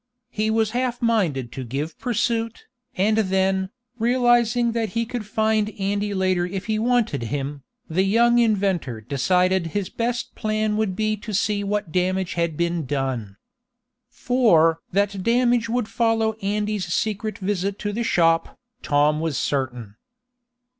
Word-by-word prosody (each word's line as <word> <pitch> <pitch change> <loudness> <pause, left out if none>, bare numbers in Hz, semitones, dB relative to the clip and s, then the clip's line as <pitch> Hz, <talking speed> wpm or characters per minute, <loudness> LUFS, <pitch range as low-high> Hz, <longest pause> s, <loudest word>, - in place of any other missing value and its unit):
He 215 +1 -1
was 220 -1 +1
half 245 0 -1
minded 175 - 0
to 130 - -6
give 140 +6 -4
pursuit, 230 -1 -1 0.3
and 215 +2 +2
then, 190 -2 +1 0.3
realizing 240 0 +3
that 225 -2 -1
he 230 - +1
could 230 -2 -5
find 215 0 +1
Andy 205 +1 -1
later 185 -2 +1
if 185 +2 -4
he 220 -1 0
wanted 235 - +1
him, 140 +4 -4 0.3
the 165 +4 +1
young 235 +5 +4
inventor 195 - +1
decided 180 - +1
his 200 -3 -3
best 235 +1 -2
plan 215 0 -1
would 210 -3 0
be 215 +1 0
to 210 0 -5
see 205 +1 0
what 205 -3 -2
damage 185 +1 0
had 170 -3 -1
been 170 -3 -1
done. 130 -8 -3 0.7
For 170 -11 +3
that 200 0 0
damage 240 +1 +2
would 240 -1 0
follow 225 -2 +1
Andy's 205 -2 -2
secret 215 +2 -1
visit 200 0 -2
to 205 0 -3
the 230 - -2
shop, 165 -6 +2 0.2
Tom 150 +1 +2
was 160 -4 -1
certain. 125 -7 -2
200 Hz, 145 wpm, -23 LUFS, 170-225 Hz, 0.7 s, young